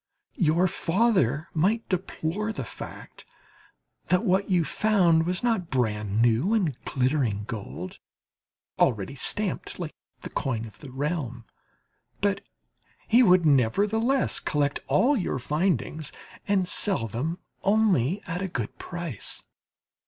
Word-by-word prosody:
Your 170 +1 +4
father 170 - +1
might 200 +8 +1
deplore 190 +2 -2
the - - -4
fact - - -10 0.8
that 180 +5 +2
what 190 +1 +2
you 175 -4 +3
found 175 -4 +3
was 180 +3 -1
not 220 -8 +1
brand 105 -4 0
new 120 - +3
and 175 - +1
glittering 130 -6 0
gold, 100 -4 -7 0.8
already 105 +2 +2
stamped 190 +8 -1
like 170 -4 -5 0.3
the - - -8
coin 115 -5 -2
of 105 -3 -13
the 145 - -10
realm; 130 -3 -3 0.7
but 200 0 +1 0.7
he 235 +3 +6
would, 180 -6 +5
nevertheless, 205 - +2
collect 145 -1 0
all 280 +5 +4
your 190 - -1
findings 155 - -1 0.4
and 195 -3 +2
sell 185 - +1
them 145 - -3 0.2
only 200 - +2
at 175 0 -3
a 190 - -1
good 120 - -5
price. 170 - -4
165 Hz, 125 wpm, -26 LUFS, 130-195 Hz, 0.8 s, he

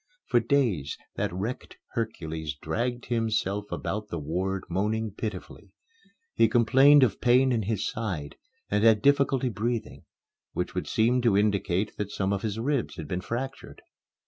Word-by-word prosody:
For 120 - +3
days, 115 - 0 0.2
that - - -1
wrecked 100 +8 -5
Hercules 80 - -4
dragged 120 - -3
himself 105 -3 -1
about 105 +1 -3
the 85 - -4
ward 90 +5 -2
moaning 105 +4 -1
pitifully. 105 +2 -7 0.6
He 115 - +4
complained 135 +5 +6
of 110 -6 +1
pain 125 +2 +4
in 115 -2 +1
his 105 0 -1
side 90 -10 -4 0.4
and 105 +1 +2
had 110 -2 +5
difficulty 140 -2 +3
in 125 - -1
breathing, 115 +2 -3 0.5
which - - -3
would - - -3
seem 120 +3 +2
to 115 -5 +3
indicate 100 -1 +1
that 105 -1 -3
some 100 -1 -1
of 100 - -2
his 110 -1 -3
ribs 135 +2 -1
had 80 - -7
been 90 +4 -3
fractured. 130 +7 -6
110 Hz, 155 wpm, -27 LUFS, 95-120 Hz, 0.6 s, complained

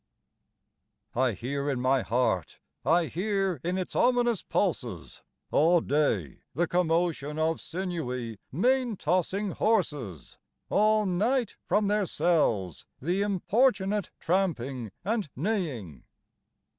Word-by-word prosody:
_I 125 -3 +2
HEAR 140 +7 -3
in 135 -3 -1
my 130 +1 +2
heart, 110 - 0 0.3
I 170 +2 +3
hear 190 - -1
in 180 +2 -1
its 185 - -4
ominous 240 -4 +3
pulses, - - -2 0.3
All 170 +3 +5
day, 140 - 0 0.2
the 170 +4 +2
commotion 165 -4 0
of 160 +1 0
sinewy, 145 - -4
mane 245 - +1
tossing 185 +5 0
horses; 145 - -1 0.3
All 215 0 +4
night, 220 +7 +1
from 205 +3 +1
their 205 -1 +1
cells, 135 - +1
the 175 +8 0
importunate 205 0 +1
tramping 135 - -1
and 215 -5 -1
neighing. 140 - -2
175 Hz, 105 wpm, -28 LUFS, 135-200 Hz, 0.3 s, All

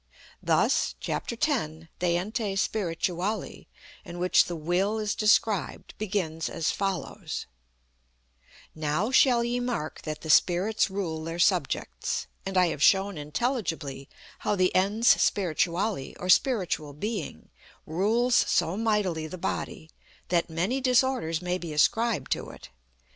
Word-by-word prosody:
Thus, - - +2
chap, - - -3
x, 235 - 0 0.5
de 175 -1 +2
Ente 205 +1 -2
Spirituali, 185 0 -2 0.4
in 175 - -9
which 180 +1 +4
the 175 - -5
Will 180 +7 0
is 210 -1 -1
described, 210 -2 +1
begins 180 -6 -2
as 165 -3 -1
follows: 195 -6 -3 1.3
"Now 155 - -1
shall 250 -3 +5
ye 240 +1 -1
mark 240 -11 -3
that 155 -1 -5
the 155 - 0
Spirits 190 +8 +3
rule 175 -5 -3
their 165 +1 -5
subjects. 175 - 0 0.2
And 195 -1 -2
I 180 -1 +4
have 150 - -5
shown 195 +3 +4
intelligibly 155 - -3 0.3
how 210 - 0
the 185 -1 +2
Ens 205 +5 +2
Spirituale, 180 -1 +1
or 180 - -5
Spiritual 180 - +2
Being, 170 - -5 0.3
rules 220 +9 +1
so 170 -6 +2
mightily 205 -7 0
the 185 - -7
body 160 -3 -4 0.4
that 170 -1 +1
many 185 +12 -1
disorders 250 -10 +1
may 180 +1 -1
be 170 -3 -6
ascribed 225 +9 +1
to - - -1
it. - - -12
185 Hz, 130 wpm, -27 LUFS, 165-215 Hz, 1.3 s, shall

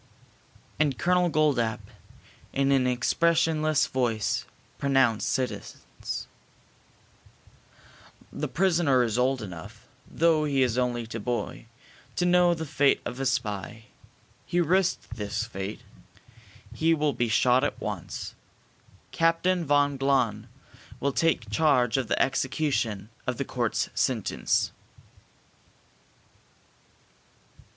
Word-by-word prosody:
And 145 -4 +2
Colonel 180 0 +2
Goldapp, 140 -8 +1 0.7
in 140 0 +2
an 130 -2 +3
expressionless 155 +4 +2
voice, 115 -5 -1 0.3
pronounced 135 -5 +2
sentence. 130 -1 -4 2.1
"The - - -3
prisoner 165 -8 +2
is 115 0 -1
old 130 -1 +1
enough, 85 -5 -10 0.2
though 160 -2 +2
he 140 -3 +2
is 120 -3 0
only 120 -2 -1
a 115 - -3
boy, 120 +1 -4 0.5
to 180 - +1
know 180 -1 +4
the 160 -1 -5
fate 140 -1 +2
of 125 - -5
a 135 - 0
spy. 110 -4 -3 0.6
He 175 - 0
risked 175 -8 +1
this 105 +1 -2
fate. 100 -1 -6 0.9
He 165 +1 +2
will 150 -2 0
be 120 -1 -1
shot 125 +3 +3
at - - -2
once. - - -5 0.8
Captain 165 +2 +2
von 145 -1 +2
Glahn 130 -6 +1 0.5
will 140 0 0
take 165 0 +1
charge 125 -7 +3
of 130 -3 -1
the - - 0
execution 130 -6 0 0.2
of 125 -2 -1
the 140 - -2
court's 120 -3 -1
sentence." - - 0
135 Hz, 110 wpm, -27 LUFS, 120-155 Hz, 2.1 s, know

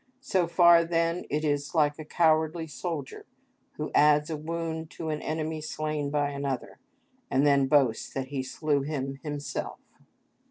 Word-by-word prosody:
So 185 -9 +1
far 170 -1 +6
then 165 +1 0
it 155 +2 -1
is 145 +1 -1
like 150 -1 +2
a - - -5
cowardly 160 0 +2
soldier, 155 -2 -6 0.5
who - - -5
adds 150 +1 +4
a - - -1
wound 160 +1 -4
to 160 - -4
an 150 -1 -2
enemy 155 0 -3
slain 155 -1 -3
by 145 0 0
another, 140 -2 -4 0.5
and 135 +2 +2
then 140 -2 +4
boasts 130 -5 +2
that 130 -1 -3
he 140 -2 -2
slew 145 +2 -1
him 135 -2 -4
himself. 145 -2 -4
150 Hz, 155 wpm, -28 LUFS, 145-160 Hz, 0.5 s, far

